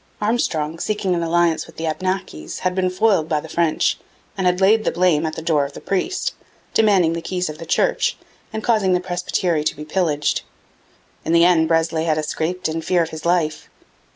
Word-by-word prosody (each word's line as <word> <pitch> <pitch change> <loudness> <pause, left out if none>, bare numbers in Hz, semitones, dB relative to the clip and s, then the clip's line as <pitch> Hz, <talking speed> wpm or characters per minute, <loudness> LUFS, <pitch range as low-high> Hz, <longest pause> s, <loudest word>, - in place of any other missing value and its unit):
Armstrong, 165 -8 -1
seeking 205 -2 -1
an 170 - 0
alliance 170 0 +1
with - - -16
the 165 - -3
Abnakis, 170 - -3
had 185 0 0
been 185 0 +1
foiled 185 -4 +2
by 155 -2 +1
the 160 - -9
French 165 -1 +1 0.4
and 190 -2 0
had 180 0 +2
laid 215 +3 +4
the - - +1
blame 170 -3 +2
at 155 - -4
the 160 - -6
door 155 -3 +2
of 140 0 -5
the - - -8
priest, 345 - -1 0.4
demanding 195 -7 +4
the 170 - -3
keys 180 0 -2
of 155 - -12
the 165 - -8
church - - +1 0.3
and 220 -1 -4
causing 215 -5 +2
the 180 - +3
presbytery 175 -2 -1
to 155 - -1
be 150 +1 -8
pillaged. 155 -3 0 0.8
In 165 - -1
the 170 0 +6
end 165 -3 +4
Breslay 165 0 +1
had 155 -2 +1
escaped 160 +4 -2
in 160 +1 -3
fear 175 +1 +2
of 160 - -6
his 160 +1 -5
life. 170 -3 0
170 Hz, 205 wpm, -21 LUFS, 160-185 Hz, 0.8 s, the